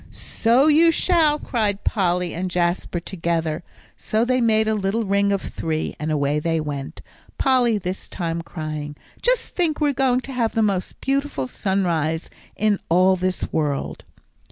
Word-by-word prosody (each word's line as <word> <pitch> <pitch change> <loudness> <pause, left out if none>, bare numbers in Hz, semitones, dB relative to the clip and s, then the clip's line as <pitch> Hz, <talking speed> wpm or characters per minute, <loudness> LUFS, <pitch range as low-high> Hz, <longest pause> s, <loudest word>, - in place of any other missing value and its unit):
"So 240 +5 +2
you 315 +2 +6
shall," 320 -3 +3
cried 215 -8 -1
Polly 180 -3 0
and 185 +2 -3
Jasper 175 0 -1
together; 165 -2 -2 0.3
so 220 +2 0
they 255 0 +1
made 220 -1 +3
a 220 - +2
little 210 +2 0
ring 200 0 +2
of 200 -1 0
three, 155 -1 -3
and 155 +1 -2
away 145 0 +1
they 165 +1 0
went, 145 -3 -5 0.3
Polly 250 -4 +3
this 185 -1 -5
time 170 -2 -3
crying, 155 -3 -6 0.3
"Just - - 0
think, 330 -4 0
we're 295 -2 +2
going 260 -2 +2
to 270 - -7
have 235 -3 0
the 225 - +3
most 195 -3 -1
beautiful 275 - -1
sunrise 165 -1 -1 0.2
in 210 -2 +1
all 185 +3 +5
this 185 0 -2
world." 150 -3 -2
195 Hz, 155 wpm, -22 LUFS, 165-240 Hz, 0.3 s, you